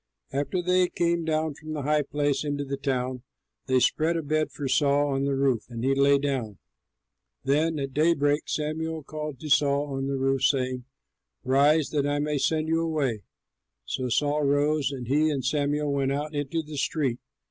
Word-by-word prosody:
After 145 +6 -1
they 180 0 +3
came 170 -1 0
down 155 -1 0
from 155 +2 -8
the 150 -2 -3
high 150 +1 +2
place 145 -1 -1
into 145 -1 -2
the 140 0 -3
town, 130 -2 -2 0.5
they 130 -1 +3
spread 160 +6 +2
a 165 - -3
bed 155 +1 0
for 145 - -4
Saul 145 +2 +2
on 135 0 0
the 140 -1 0
roof, 135 -4 +1
and 115 -1 -6
he 135 +1 +3
lay 140 +1 +4
down. 130 -8 -2 0.9
Then 155 +4 +1
at 135 -2 -4
daybreak 150 -1 +2
Samuel 155 +1 -2
called 150 -2 -6
to 155 - -6
Saul 140 0 +2
on 135 0 -2
the 140 0 -1
roof, 135 0 0
saying, 130 -2 +1 0.6
"Rise, 140 +4 +3
that 145 -2 +1
I 145 0 0
may 150 0 -1
send 155 +2 +1
you 165 +1 +1
away." 145 -9 -1 0.6
So 130 -1 -3
Saul 145 +4 +1
rose, 145 0 +2
and 125 -4 -6
he 150 +4 +3
and 135 -4 -2
Samuel 145 +1 0
went 135 -1 0
out 150 +2 -3
into 145 +3 -2
the 150 -1 -8
street. 135 -4 -1
145 Hz, 185 wpm, -26 LUFS, 135-155 Hz, 0.9 s, lay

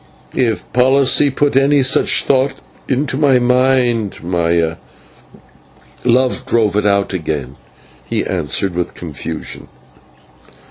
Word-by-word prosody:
"If 115 -7 -2
policy 135 +3 +3
put 140 0 0
any 140 +1 +3
such 130 +2 +3
thought 135 0 +1 0.3
into 135 +1 -1
my 140 -3 +3
mind, 125 -4 +1
Maya, 85 -1 0 1.3
love 125 +1 +2
drove 115 -4 +1
it 105 0 +1
out 100 -1 +1
again," 75 -7 -4 0.5
he - - -2
answered, 95 -2 -1
with 90 0 -4
confusion. 80 -1 -7
120 Hz, 105 wpm, -16 LUFS, 90-130 Hz, 1.3 s, policy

